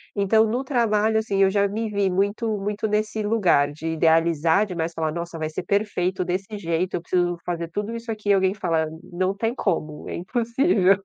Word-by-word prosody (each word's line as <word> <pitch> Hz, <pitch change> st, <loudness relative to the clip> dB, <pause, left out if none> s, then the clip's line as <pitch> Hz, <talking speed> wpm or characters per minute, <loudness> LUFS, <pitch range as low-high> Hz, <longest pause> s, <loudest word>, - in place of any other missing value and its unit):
Então 220 Hz, +2 st, +3 dB
no 245 Hz, +5 st, -1 dB
trabalho, 220 Hz, -4 st, +2 dB
assim, 200 Hz, -3 st, +1 dB
eu 190 Hz, -, +4 dB
já 200 Hz, 0 st, +2 dB
me 220 Hz, +2 st, -3 dB
vi 200 Hz, -2 st, +1 dB
muito 205 Hz, +3 st, 0 dB
muito 210 Hz, +2 st, -2 dB
nesse 215 Hz, +1 st, -1 dB
lugar 190 Hz, -10 st, +2 dB
de 160 Hz, +2 st, -5 dB
idealizar 165 Hz, +2 st, +3 dB
demais 170 Hz, -4 st, -3 dB
falar: 160 Hz, -1 st, -1 dB
"Nossa, 170 Hz, 0 st, -5 dB
vai 155 Hz, -1 st, -2 dB
ser 155 Hz, -, -4 dB
perfeito 190 Hz, -3 st, 0 dB
desse 195 Hz, +4 st, -3 dB
jeito. 170 Hz, 0 st, -1 dB
Eu -, -, -2 dB
preciso 175 Hz, 0 st, 0 dB
fazer 170 Hz, -1 st, -3 dB
tudo 205 Hz, +6 st, -4 dB
isso 230 Hz, 0 st, -5 dB
aqui." 210 Hz, -1 st, -4 dB
E 200 Hz, -, +7 dB
alguém 190 Hz, 0 st, +2 dB
fala: 165 Hz, -5 st, 0 dB, 0.2 s
"Não 185 Hz, +2 st, -2 dB
tem 225 Hz, +3 st, -1 dB
como, 160 Hz, -, -2 dB
é -, -, -4 dB
impossível." 225 Hz, -, +2 dB
195 Hz, 195 wpm, -23 LUFS, 170-215 Hz, 0.2 s, E